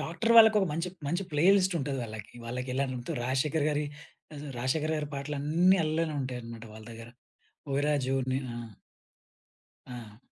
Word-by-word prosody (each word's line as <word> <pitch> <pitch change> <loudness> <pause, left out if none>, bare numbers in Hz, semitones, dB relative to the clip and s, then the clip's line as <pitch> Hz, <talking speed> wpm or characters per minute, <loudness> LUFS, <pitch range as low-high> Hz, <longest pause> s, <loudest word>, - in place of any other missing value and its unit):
Tractor 225 +8 0
వాళ్ళకొక 220 -3 +8
మంచి 165 +4 -2 0.2
మంచి 175 +6 0
ప్లే 150 +2 +2
లిస్ట్ 185 -2 +2
ఉంటది 135 -1 -2
వాళ్ళకి. 110 -2 -8
వాళ్లకి 125 +2 -4
ఎలాంతు 130 -3 -2
రాశేఖర్ 145 +4 +1
గారి, 150 0 0 0.5
అస 145 - -7 0.2
రాశేఖర్ 150 +6 0
గారి 150 -1 -3
పాటలన్నీ 150 +6 +2
అల్లనే 155 0 0
ఉంటాయన్నమాట 120 -3 -6
వాళ్ళ 110 - -11
దగ్గర. 115 0 -10 0.7
'ఓయి 140 - +1
రాజు 135 -3 +1 0.2
నే' 130 - +1 0.2
ఆహ్ 115 -3 -8 1.2
ఆ! 115 -3 -9
140 Hz, 145 wpm, -29 LUFS, 125-160 Hz, 1.2 s, వాళ్ళకొక